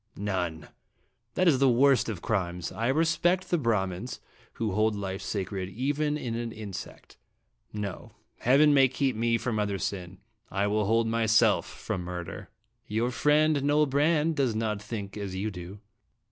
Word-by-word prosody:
" 110 - -44 0.2
None. 80 -4 -3 0.7
That 185 - +2
is 140 -6 +4
the 135 -1 +5
worst 130 +1 +4
of 100 -6 -5
crimes. 90 -5 -2
I 115 +1 -2
respect 165 +5 +1
the 175 - +3
Brahmins, 105 -3 -1 0.3
who 110 -3 -2
hold 110 +2 +2
life 95 -1 -4
sacred 95 -2 -3
even 145 +6 -1
in 120 -6 -4
an 115 0 -3
insect. 100 -5 -9 0.5
No. 100 -3 -6 0.3
Heaven 145 +4 +5
may 135 -2 +6
keep 130 -1 -1
me 115 +1 +1
from 115 -1 -2
other 100 -1 0
sin 95 -1 -4 0.3
I 100 +1 0
will 105 0 +1
hold 115 +2 +2
myself 115 -1 +3
from 90 - -5
murder." 90 -1 -6 0.2
" - - -45
Your 115 +4 0
friend, 150 +2 +3
Noel 145 +2 +3
Brande, 150 +3 +2
does 130 -6 +1
not 110 -2 -1
think 105 -2 -6
as 100 -2 -5
you 105 +3 -2
do." 90 +2 -9
110 Hz, 165 wpm, -28 LUFS, 100-135 Hz, 0.7 s, may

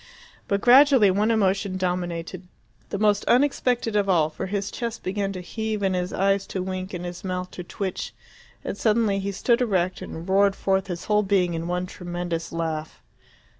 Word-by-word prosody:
But 200 0 0
gradually 255 -4 +7
one 205 +4 +1
emotion 195 -3 +1
dominated, 180 -1 -3 0.4
the - - -3
most 210 0 +2
unexpected 245 -4 +2
of 200 -1 +2
all; 160 -4 +3
for - - -5
his 200 +1 -2
chest 230 -1 -5
began 195 +1 -1
to 185 - -6
heave 215 +3 -3
and 190 -1 +2
his 180 0 -2
eyes 195 +1 +1
to 185 - -3
wink 185 0 -4
and 180 0 -5
his 175 +2 -7
mouth 180 -1 -3
to 180 - -7
twitch, 190 +1 -4 0.5
and - - -3
suddenly 215 -3 +2
he 200 +1 -2
stood 235 +5 +1
erect 185 -6 0
and 165 +2 -7
roared 195 +1 +3
forth 190 0 0
his 175 -2 -5
whole 210 -1 +3
being 190 -4 +1
in 165 0 -3
one 180 +1 -1
tremendous 175 -2 -5
laugh. 160 -2 -4
190 Hz, 180 wpm, -24 LUFS, 180-210 Hz, 0.5 s, gradually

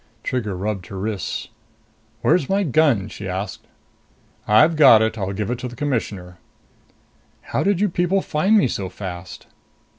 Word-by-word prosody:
Trigger 105 -7 -2
rubbed 100 -1 -3
her 95 - -8
wrists. 100 0 -4 0.7
"Where's 155 -7 +2
my 200 +1 +2
gun?" 140 - +2
she 100 -1 -7
asked. 95 +1 -5 0.8
"I've 155 +11 +5
got 130 -8 +7
it. 110 0 -1
I'll 100 -3 -3
give 105 +3 -3
it 125 - -3
to 125 - -4
the 120 - -9
Commissioner." 105 - -3 1.1
"How - - +1
did 200 0 +1
you 210 - +3
people 180 +1 0
find 190 +8 +2
me 200 - +4
so 95 -5 -4
fast?" 90 -1 -8
110 Hz, 155 wpm, -21 LUFS, 95-155 Hz, 1.1 s, got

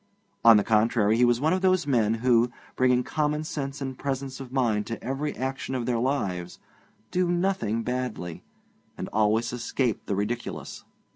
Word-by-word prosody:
On 115 -2 +9
the 105 - +3
contrary, 110 0 +3
he 120 - +3
was 120 -1 +3
one 155 +5 +2
of 185 - 0
those 185 -3 +3
men 115 -6 +2
who, 120 -1 +4 0.2
bringing 125 -1 +3
common 150 +1 -1
sense 140 -2 -4
and 135 -1 -4
presence 135 -1 -4
of 130 -2 -8
mind 115 -6 +1
to 115 - -5
every 135 +4 -3
action 130 0 -3
of 125 -2 -2
their 120 -1 0
lives, 95 -9 -2 0.5
do 180 -1 +1
nothing 175 - 0
badly, 125 -9 -4 0.6
and - - -5
always 110 +2 +2
escape 120 -1 -2
the 100 - 0
ridiculous. 110 +5 -4
125 Hz, 165 wpm, -26 LUFS, 115-140 Hz, 0.6 s, On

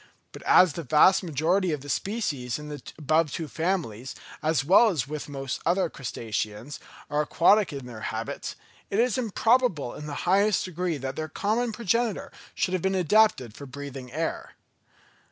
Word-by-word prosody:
But - - -11
as 180 -5 +6
the 170 - -4
vast 155 +7 +5
majority 175 +3 +1
of 150 -3 -2
the 145 - -11
species 145 - -2
in 150 0 -8
the 145 -2 -7 0.2
above 155 0 +2
two 160 +1 -4
families, 155 - -2 0.3
as 155 -2 +1
well 200 +8 +6
as 145 -10 -1 0.2
most 135 -2 -4
other 175 -1 +1
crustaceans, 115 0 -4 0.3
are 150 0 0
aquatic 185 +6 +3
in 140 -3 -6
their 120 -3 -9
habits, - - -5 0.3
it 200 - -1
is 245 0 +2
improbable 230 - +1
in 150 - -8
the 145 - -5
highest 200 +2 +3
degree 180 -2 -2
that 135 0 -5
their 155 0 -4
common 220 +8 0
progenitor 230 +1 -1 0.2
should 185 - 0
have 185 - 0
been 190 +2 0
adapted 190 - +3
for 140 +4 -10
breathing 135 -1 -8
air. 160 +4 -3
160 Hz, 165 wpm, -26 LUFS, 140-195 Hz, 0.3 s, as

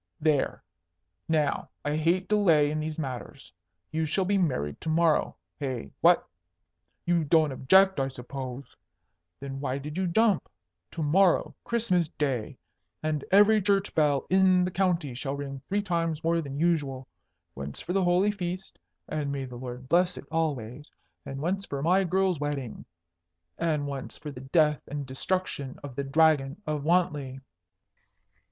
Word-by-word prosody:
There! 150 -3 +1 0.7
Now, 155 -3 +1 0.2
I 145 +1 0
hate 170 +4 +1
delay 170 -9 +4
in 155 - -2
these 155 0 -4
matters. 130 -6 -6 0.4
You 160 0 -1
shall 185 +5 0
be 200 +1 +2
married 125 - -1
to 160 - -3
morrow. 160 -1 +2 0.2
Hey? 130 -5 -4
What? 175 +1 +5 0.8
You 175 -1 +2
don't 155 0 +3
object, 190 +7 +4
I 135 - +1
suppose? 130 0 -7 0.6
Then 135 0 -6
why 135 -1 -2
did 150 +5 -5
you 190 - +1
jump? 210 +1 +2 0.4
To 165 - -3
morrow, 180 +5 +3
Christmas 215 -8 +1
Day, 130 -7 -1 0.5
and 155 -2 -1
every 210 +2 +6
church 200 0 +1
bell 145 -3 +2
in 185 -1 +4
the 180 - -2
county 175 -7 0
shall 135 +3 -4
ring 140 -1 -6
three 205 +1 0
times 165 -4 -1
more 165 +1 +2
than 140 -2 -6
usual. 145 -6 0 0.5
Once 70 +1 -7
for 180 - -4
the 195 0 +2
holy 180 +4 +3
Feast, 185 -1 -5 0.3
and 150 -2 -2
may 140 -1 -3
the 125 -1 -9
Lord 125 +1 -7
bless 175 +4 +2
it - - -8
always! 150 -4 -2 0.4
and 135 - -5
once 195 +5 -1
for 140 0 -4
my 185 +4 +4
girl's 185 -2 +1
wedding. 145 -5 -4 0.7
And 155 -3 0
once 140 -2 -6
for 150 - -7
the 125 -2 -9
death 150 +2 +2
and 145 -1 -4
destruction 135 0 -3
of 140 -3 -8
the 140 - -2
Dragon 145 0 +3
of 150 -1 -2
Wantley." 150 -6 +1
155 Hz, 155 wpm, -28 LUFS, 140-180 Hz, 0.8 s, every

